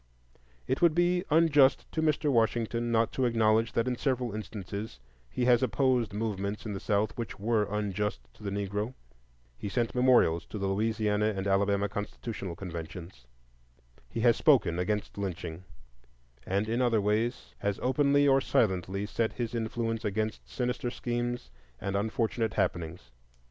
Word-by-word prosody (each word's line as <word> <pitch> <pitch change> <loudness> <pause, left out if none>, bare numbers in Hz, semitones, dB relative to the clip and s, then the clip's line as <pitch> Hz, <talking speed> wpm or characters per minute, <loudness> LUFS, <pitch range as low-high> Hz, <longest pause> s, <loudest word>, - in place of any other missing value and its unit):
It 130 - -1
would 170 -3 +5
be 175 +1 +2
unjust 150 -4 +5
to 160 - -1
Mr. 150 -1 +2
Washington 115 0 +1
not 115 0 +2
to 130 - 0
acknowledge 115 -1 +2
that 115 +1 +1
in 125 - 0
several 125 -3 -1
instances 105 - -6 0.3
he 125 - -1
has 120 -1 +5
opposed 125 -1 +2
movements 105 -1 -3
in 105 - -3
the 95 - -4
South 105 +1 0
which 115 -4 -4
were 110 0 +1
unjust 105 -6 -1
to - - -20
the 105 - -3
Negro; 100 +4 -3 0.6
he 105 - -4
sent 115 +2 -1
memorials 125 -10 +4
to - - -6
the 100 - -2
Louisiana 105 +1 +1
and 95 - -2
Alabama 100 +1 +2
constitutional 105 -2 -5
conventions, 85 -6 -8 0.8
he 115 - -3
has 120 -1 +5
spoken 120 - +3
against 100 +2 -2
lynching, 90 -3 -5 0.8
and 100 +3 0
in 115 +3 0
other 120 -3 +3
ways 110 +4 -1
has 100 -1 -1
openly 140 +2 +3
or 135 0 +5
silently 95 -4 +1
set 110 +1 -1
his 120 -2 -3
influence 115 0 -2
against 110 +1 -2
sinister 125 -1 -2
schemes 120 - -3 0.3
and 100 0 -3
unfortunate 110 0 -1
happenings. 85 -8 -2
110 Hz, 150 wpm, -29 LUFS, 100-120 Hz, 0.8 s, would